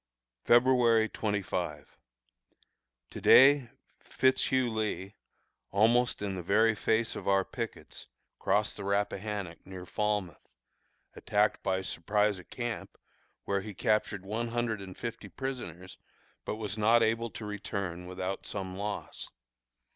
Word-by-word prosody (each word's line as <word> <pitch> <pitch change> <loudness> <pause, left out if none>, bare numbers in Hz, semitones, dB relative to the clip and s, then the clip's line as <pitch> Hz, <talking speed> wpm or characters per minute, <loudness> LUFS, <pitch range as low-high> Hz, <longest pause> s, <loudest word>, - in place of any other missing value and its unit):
February 120 -2 +5
25. 90 -9 -3 1.2
To - - -8
day 135 -2 +7 0.3
Fitz 130 +1 +2
Hugh 130 -2 +1
Lee, 105 -3 -3 0.6
almost 115 +2 +3
in 100 -1 -2
the 90 - -4
very 110 +5 +3
face 110 +2 0
of - - -7
our 95 -1 +3
pickets, - - -7 0.3
crossed - - +1
the - - -6
Rappahannock 100 -2 -2
near 95 -1 -9
Falmouth, 105 -6 -2 0.7
attacked 105 0 +1
by 95 0 -1
surprise 105 +3 0
a - - -11
camp, 120 +4 -5 0.5
where 100 -1 -1
he 105 -1 -8
captured 105 -1 0
one 110 +4 -2
hundred 115 -3 -2
and 95 -1 -9
fifty 115 -3 -6
prisoners, 95 - -6 0.5
but - - -2
was 110 -1 -5
not 115 +2 +5
able 115 +1 +1
to 110 - -8
return 100 -4 -4
without 90 +1 -4
some 95 -2 -4
loss. 100 +1 -5
105 Hz, 125 wpm, -30 LUFS, 95-115 Hz, 1.2 s, day